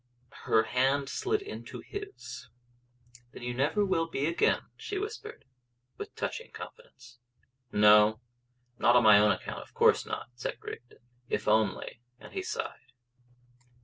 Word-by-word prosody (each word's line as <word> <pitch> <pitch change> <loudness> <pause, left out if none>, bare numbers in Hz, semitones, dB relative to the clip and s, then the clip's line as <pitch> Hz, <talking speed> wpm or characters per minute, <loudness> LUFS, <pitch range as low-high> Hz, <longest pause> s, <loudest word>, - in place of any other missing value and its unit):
Her 110 - +4
hand 135 +4 +1
slid 420 - -1
into 415 - -8
his. 405 0 -8 0.8
"Then - - -10
you 120 0 -2
never 145 +11 +1
will 165 -4 +1
be 145 -3 -2
again," 170 +2 +2
she 410 - -5
whispered, 430 +2 -6 0.5
with 420 - -5
a - - -47
touching 470 - -4
confidence. 135 - -12 0.5
"No, 105 +1 +6 0.6
not 120 - +5
on 125 - +6
my 105 -2 +8
own 105 0 +5
account; - - -4
of - - -16
course - - +5
not," - - -5
said 120 - -4
Rigden. 120 - -9 0.3
"If - - -2
only 110 +2 +1
" 125 0 -44
And - - -13
he 380 - -2
sighed. 140 - -5
135 Hz, 145 wpm, -30 LUFS, -, 0.8 s, my